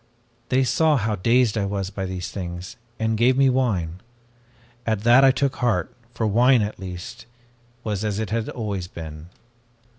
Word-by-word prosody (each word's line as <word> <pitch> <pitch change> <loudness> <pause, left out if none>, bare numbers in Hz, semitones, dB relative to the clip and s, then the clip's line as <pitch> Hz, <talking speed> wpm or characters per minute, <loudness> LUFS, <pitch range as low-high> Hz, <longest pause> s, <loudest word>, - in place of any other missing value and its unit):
"They 130 +1 +3
saw 155 +3 +3
how 110 -2 0
dazed 115 +3 +2
I 100 - 0
was 100 -1 -3
by 95 -1 -4
these 90 -1 -5
things, 90 +3 -6 0.2
and 110 0 0
gave 125 +4 +3
me 135 -1 +5
wine. 95 -10 -1 0.8
At 110 -4 -1
that 120 +4 +6
I 135 - +8
took 135 +1 0
heart, 110 -9 0 0.2
for 110 - -1
wine, 120 +3 +4
at 105 -2 -5
least, 90 +3 -8 0.6
was 105 -2 -2
as 105 -2 -1
it 110 -2 -3
had 115 0 -1
always 100 -6 -4
been. 80 -1 -9
110 Hz, 170 wpm, -23 LUFS, 95-125 Hz, 0.8 s, I